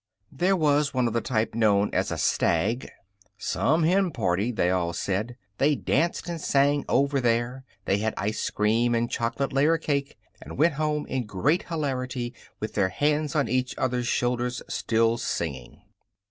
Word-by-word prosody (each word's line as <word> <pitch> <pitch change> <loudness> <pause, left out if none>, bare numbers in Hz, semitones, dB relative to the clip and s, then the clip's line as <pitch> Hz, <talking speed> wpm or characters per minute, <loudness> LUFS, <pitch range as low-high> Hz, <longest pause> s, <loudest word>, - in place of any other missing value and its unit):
There 180 +7 +2
was 150 -4 +2
one 125 -1 +2
of 115 - 0
the 115 - +1
type 110 -3 -1
known 105 -3 +2
as - - +1
a - - -3
stag. 105 +9 +1 0.5
"Some 160 +3 +1
hen 185 +3 +3
party!" 105 - 0
they 90 -6 +1
all 85 -2 0
said. 105 +7 -2 0.2
They 145 +2 +3
danced, 170 +5 0
and 170 -2 -4
sang 140 +1 +2
"Over 140 +1 +2
There." 120 +2 0 0.2
They 100 - +1
had 110 +1 -1
ice 105 +3 -1
cream 115 +3 +1
and 120 +1 0
chocolate 130 +4 -2
layer 150 +4 +3
cake 140 -3 -2 0.2
and - - -9
went 160 +3 +4
home 150 +1 -1
in 125 -4 -3
great 135 - 0
hilarity, 130 -6 -3 0.3
with 110 - -4
their 100 -2 +2
hands 150 +6 0
on 145 -3 +2
each 130 +2 -1
other's 125 -2 -1
shoulders, 125 0 -1
still 115 0 +1
singing. 70 - -4
125 Hz, 165 wpm, -26 LUFS, 110-145 Hz, 0.5 s, went